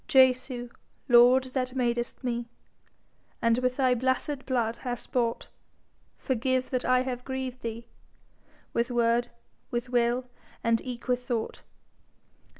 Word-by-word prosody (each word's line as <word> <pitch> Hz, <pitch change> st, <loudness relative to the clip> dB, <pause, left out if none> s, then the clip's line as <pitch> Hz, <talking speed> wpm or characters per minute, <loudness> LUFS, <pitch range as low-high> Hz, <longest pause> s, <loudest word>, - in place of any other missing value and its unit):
Jesu, 255 Hz, -2 st, +3 dB, 0.4 s
Lord, 245 Hz, +1 st, +7 dB
that 255 Hz, -1 st, -2 dB
madest 240 Hz, 0 st, -1 dB
me, 240 Hz, -1 st, -2 dB, 0.9 s
And 230 Hz, +1 st, +3 dB
with 255 Hz, 0 st, 0 dB
thy 260 Hz, -2 st, +4 dB
blessed 260 Hz, +3 st, -1 dB
blood 235 Hz, -3 st, 0 dB
hast 245 Hz, -2 st, -5 dB
bought, 235 Hz, -2 st, 0 dB, 0.7 s
Forgive 255 Hz, 0 st, 0 dB
that 255 Hz, -1 st, 0 dB
I 255 Hz, 0 st, +3 dB
have 250 Hz, -1 st, -4 dB
grieved 260 Hz, -1 st, -4 dB
thee 230 Hz, 0 st, -5 dB, 0.9 s
With 235 Hz, +1 st, +1 dB
word, 240 Hz, 0 st, +2 dB, 0.4 s
with 240 Hz, +1 st, -3 dB
will, 245 Hz, +1 st, +2 dB, 0.4 s
and 230 Hz, -1 st, +2 dB
eke 245 Hz, -1 st, -7 dB
with 250 Hz, 0 st, +1 dB
thought. 230 Hz, -3 st, -2 dB
245 Hz, 125 wpm, -28 LUFS, 235-255 Hz, 0.9 s, Lord